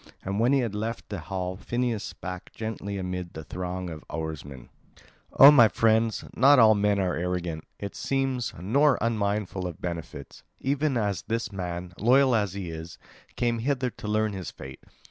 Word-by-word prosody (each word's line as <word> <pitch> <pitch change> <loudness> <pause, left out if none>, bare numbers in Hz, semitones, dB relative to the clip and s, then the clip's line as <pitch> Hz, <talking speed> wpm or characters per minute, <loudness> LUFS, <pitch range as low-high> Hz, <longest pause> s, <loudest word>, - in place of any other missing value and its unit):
And 100 +2 -2
when 120 +3 +3
he 140 -1 +4
had 115 -4 -2
left 110 +2 -4
the 100 -3 -4
hall 90 +1 -4
Phineus 120 -1 -2
spake 90 -1 -7
gently 110 -2 -5
amid 90 -2 -4
the 80 - -6
throng 90 +2 -5
of 80 -1 -8
oarsmen: 75 -5 -6 0.7
"O 140 +2 +11
my 120 -6 +7
friends, 110 +2 +2
not 140 +4 +6
all 110 -3 +7
men 105 -1 +2
are 95 -2 0
arrogant, 85 -2 -3
it 100 -1 -6
seems, 135 -3 -1
nor 135 - +3
unmindful 100 -4 -1
of 85 0 -8
benefits. 85 -4 -6 0.2
Even 140 0 0
as 100 -6 -1
this 115 0 -2
man, 90 -2 -5
loyal 130 +4 +4
as 105 -5 +1
he 95 -4 -5
is, 80 +1 -8 0.4
came 120 0 0
hither 130 0 0
to 105 - -9
learn 105 0 +1
his 95 -4 -5
fate. 65 -1 -11
100 Hz, 170 wpm, -27 LUFS, 90-115 Hz, 0.7 s, O